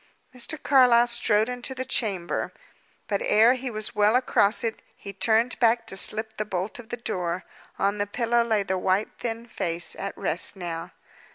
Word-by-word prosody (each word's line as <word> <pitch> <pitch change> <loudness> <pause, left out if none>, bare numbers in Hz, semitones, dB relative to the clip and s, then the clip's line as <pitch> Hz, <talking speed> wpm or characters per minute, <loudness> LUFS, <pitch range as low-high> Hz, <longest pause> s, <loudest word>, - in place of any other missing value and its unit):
Mr. 255 +5 -3
Carlyle 250 -4 +5
strode 225 -3 +2
into 250 +1 -4
the 260 0 -4
chamber. 195 -10 -1 0.6
But 200 -2 -1
ere 225 +4 +5
he 260 0 -5
was 215 -2 -4
well 210 +2 +3
across 225 -4 +2
it, 225 -1 -3
he 200 - -9
turned 225 +4 +1
back 230 -1 +3
to - - -1
slip 220 +3 +1
the 215 - -1
bolt 195 +2 -4
of 235 -1 -12
the 240 - -4
door. 180 -6 -3 0.3
On 200 +1 0
the 205 - -1
pillow 235 +2 +1
lay 220 -3 0
the 190 -1 -2
white, 190 +3 0
thin 230 -1 -4
face, 175 -6 0
at - - -6
rest - - 0
now. 170 -3 -5
220 Hz, 180 wpm, -25 LUFS, 200-240 Hz, 0.6 s, Carlyle